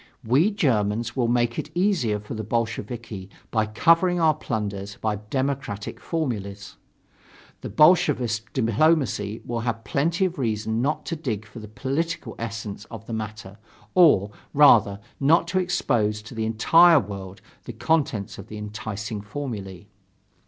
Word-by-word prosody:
We 135 Hz, -, +3 dB
Germans 120 Hz, -, 0 dB
will 125 Hz, -3 st, +1 dB
make 120 Hz, 0 st, +1 dB
it -, -, -5 dB
easier 175 Hz, -, +1 dB
for 105 Hz, +2 st, -8 dB
the 110 Hz, -1 st, -4 dB
Bolsheviki 110 Hz, -2 st, -4 dB, 0.2 s
by 110 Hz, -2 st, +1 dB
covering 165 Hz, -, +3 dB
our 160 Hz, -2 st, +4 dB
plunders 100 Hz, -8 st, -4 dB
by 110 Hz, -1 st, -1 dB
democratic 135 Hz, -6 st, -3 dB
formulas. 105 Hz, -, -4 dB, 0.8 s
The -, -, -6 dB
Bolshevist 130 Hz, -, +3 dB
diplomacy 115 Hz, -3 st, +1 dB
will 120 Hz, -1 st, -3 dB
have 115 Hz, -1 st, -3 dB
plenty 165 Hz, -, +1 dB
of 180 Hz, -4 st, -3 dB
reason 110 Hz, -1 st, -1 dB
not 150 Hz, +3 st, -1 dB
to 165 Hz, -, -3 dB
dig 115 Hz, -9 st, -4 dB
for 115 Hz, +1 st, -11 dB
the 110 Hz, -, -9 dB
political 140 Hz, +10 st, -3 dB
essence 110 Hz, -2 st, -5 dB
of 110 Hz, -2 st, -10 dB
the 115 Hz, -, -6 dB
matter, 105 Hz, -2 st, -6 dB, 0.3 s
or, 145 Hz, -, +5 dB, 0.2 s
rather, 110 Hz, -9 st, +6 dB, 0.2 s
not 150 Hz, +5 st, +4 dB
to 185 Hz, -, +1 dB
expose 105 Hz, -, 0 dB
to 115 Hz, -, -11 dB
the 110 Hz, -1 st, -2 dB
entire 165 Hz, +9 st, +6 dB
world 100 Hz, -4 st, -7 dB, 0.3 s
the -, -, -6 dB
contents 120 Hz, -5 st, -1 dB
of 100 Hz, -, -9 dB
the 105 Hz, -, -8 dB
enticing 105 Hz, 0 st, -5 dB
formulae.... 100 Hz, -6 st, -6 dB
115 Hz, 145 wpm, -24 LUFS, 105-145 Hz, 0.8 s, rather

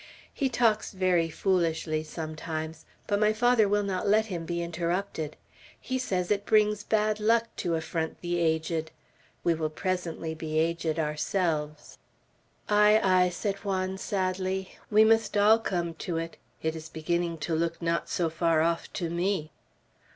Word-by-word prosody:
He 275 Hz, -2 st, 0 dB
talks 230 Hz, -4 st, +1 dB
very 180 Hz, -3 st, +2 dB
foolishly 165 Hz, -3 st, 0 dB
sometimes, 155 Hz, 0 st, -5 dB, 0.2 s
but 205 Hz, -1 st, 0 dB
my 215 Hz, 0 st, +3 dB
father 225 Hz, -2 st, +3 dB
will 205 Hz, 0 st, +2 dB
not 195 Hz, 0 st, -2 dB
let 215 Hz, +2 st, +4 dB
him 175 Hz, -6 st, -5 dB
be 170 Hz, 0 st, -2 dB
interrupted. 170 Hz, -1 st, -2 dB, 0.4 s
He 260 Hz, 0 st, -3 dB
says 185 Hz, -7 st, -1 dB
it 200 Hz, -1 st, +1 dB
brings 210 Hz, -1 st, +3 dB
bad 215 Hz, 0 st, +1 dB
luck 230 Hz, +2 st, +2 dB
to 170 Hz, -2 st, 0 dB
affront 160 Hz, 0 st, -3 dB
the 175 Hz, 0 st, -1 dB
aged. 160 Hz, -1 st, 0 dB, 0.5 s
We 170 Hz, -, +3 dB
will 160 Hz, -1 st, -2 dB
presently 170 Hz, -1 st, -3 dB
be 155 Hz, -1 st, -4 dB
aged 165 Hz, 0 st, 0 dB
ourselves." 150 Hz, -1 st, -2 dB, 0.7 s
"Ay, 210 Hz, +1 st, +5 dB
ay!" 185 Hz, -1 st, +4 dB
said 195 Hz, +3 st, -2 dB
Juan, 190 Hz, -2 st, -2 dB
sadly. 190 Hz, -1 st, -2 dB
"We 215 Hz, 0 st, +6 dB
must 225 Hz, -1 st, +3 dB
all 215 Hz, +2 st, +6 dB
come 175 Hz, -6 st, -2 dB
to 165 Hz, +1 st, -4 dB
it. 165 Hz, 0 st, -4 dB, 0.3 s
It 160 Hz, 0 st, 0 dB
is 160 Hz, 0 st, -8 dB
beginning 170 Hz, +1 st, -1 dB
to 170 Hz, -, -2 dB
look 165 Hz, +1 st, 0 dB
not 170 Hz, 0 st, -1 dB
so 170 Hz, -3 st, 0 dB
far 165 Hz, -1 st, +2 dB
off 165 Hz, 0 st, -1 dB
to 170 Hz, -4 st, -3 dB
me!" 170 Hz, -2 st, -1 dB
175 Hz, 155 wpm, -28 LUFS, 160-205 Hz, 0.7 s, We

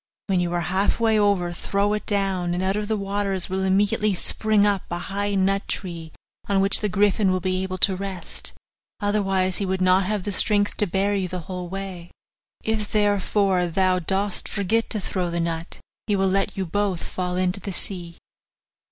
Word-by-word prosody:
'When 190 Hz, -3 st, +1 dB
you 175 Hz, -1 st, 0 dB
are 175 Hz, -, 0 dB
half 190 Hz, +6 st, +1 dB
way 220 Hz, -2 st, +3 dB
over, 195 Hz, -4 st, +2 dB
throw 200 Hz, +4 st, 0 dB
it 210 Hz, -, -3 dB
down, 190 Hz, -4 st, 0 dB
and 180 Hz, -, -1 dB
out 190 Hz, +1 st, +1 dB
of 210 Hz, 0 st, -2 dB
the 220 Hz, 0 st, 0 dB
waters 195 Hz, -2 st, 0 dB
will 190 Hz, 0 st, 0 dB
immediately 205 Hz, +2 st, +2 dB
spring 215 Hz, +3 st, +3 dB
up 200 Hz, -2 st, +2 dB
a 175 Hz, -, -2 dB
high 200 Hz, +3 st, -2 dB
nut 195 Hz, +1 st, +1 dB
tree 170 Hz, -4 st, -4 dB, 0.4 s
on 200 Hz, -1 st, +3 dB
which 195 Hz, +1 st, +4 dB
the 210 Hz, -, -1 dB
griffin 200 Hz, +1 st, +3 dB
will 185 Hz, 0 st, +1 dB
be 185 Hz, 0 st, -1 dB
able 185 Hz, 0 st, -3 dB
to 190 Hz, +1 st, +3 dB
rest, 190 Hz, -1 st, -5 dB, 0.5 s
otherwise 195 Hz, -3 st, +1 dB
he 200 Hz, -, -1 dB
would 190 Hz, 0 st, -1 dB
not 185 Hz, +1 st, +4 dB
have 210 Hz, -2 st, -1 dB
the 205 Hz, -, -2 dB
strength 205 Hz, +1 st, +1 dB
to 210 Hz, -, +2 dB
bear 195 Hz, +3 st, +1 dB
you 195 Hz, -2 st, 0 dB
the 180 Hz, 0 st, -5 dB
whole 180 Hz, +1 st, -6 dB
way; 190 Hz, -2 st, -6 dB, 0.5 s
if, 220 Hz, -1 st, -1 dB
therefore, 200 Hz, -3 st, +2 dB
thou 185 Hz, +1 st, +2 dB
dost 195 Hz, +3 st, -1 dB
forget 215 Hz, +3 st, 0 dB
to 215 Hz, -, 0 dB
throw 185 Hz, -1 st, -2 dB
down 170 Hz, -, -3 dB
the 170 Hz, -, -1 dB
nut, 165 Hz, 0 st, -2 dB, 0.3 s
he 210 Hz, -, +2 dB
will 195 Hz, 0 st, +2 dB
let 195 Hz, +1 st, 0 dB
you 190 Hz, -, -1 dB
both 195 Hz, 0 st, -1 dB
fall 180 Hz, -1 st, -3 dB
into 185 Hz, +1 st, 0 dB
the 195 Hz, +1 st, -5 dB
sea. 175 Hz, -2 st, -2 dB
195 Hz, 200 wpm, -24 LUFS, 185-205 Hz, 0.5 s, which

